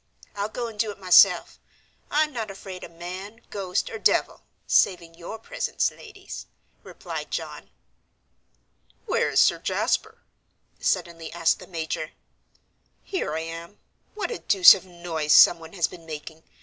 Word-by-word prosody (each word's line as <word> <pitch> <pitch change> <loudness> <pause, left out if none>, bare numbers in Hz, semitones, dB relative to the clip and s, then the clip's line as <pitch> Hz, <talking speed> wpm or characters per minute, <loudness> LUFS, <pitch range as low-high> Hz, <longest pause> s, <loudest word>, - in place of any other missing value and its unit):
I'll 205 +1 -2
go 240 +2 -4
and 225 -2 -8
do 220 0 +1
it 205 - -7
myself; 185 -2 +5 0.5
I'm 305 0 +1
not 225 -4 -4
afraid 195 -1 -9
of - - -8
man, 185 +6 -8
ghost, 190 -3 -2
or 445 - -6
devil, - - +2 0.2
saving 170 -3 +2
your 175 +6 -8
presence, - - -2
ladies," 400 -2 -11 0.3
replied - - -7
John. - - -6 1.4
"Where - - +1
is - - +2
Sir - - +4
Jasper?" 450 +2 -1 0.6
suddenly 165 -2 -2
asked 165 -1 +1
the - - -12
major. 160 -2 -4 0.9
"Here 360 - -3
I 160 - -2
am. 165 +4 -8 0.4
What 425 +3 -3
a 470 - -4
deuce 360 -3 +8
of 190 - -6
a - - -18
noise 165 -3 -1
someone 165 -2 +6
has 175 -4 +1
been 165 -2 -13
making. 155 +1 -8
180 Hz, 150 wpm, -25 LUFS, 165-225 Hz, 1.4 s, deuce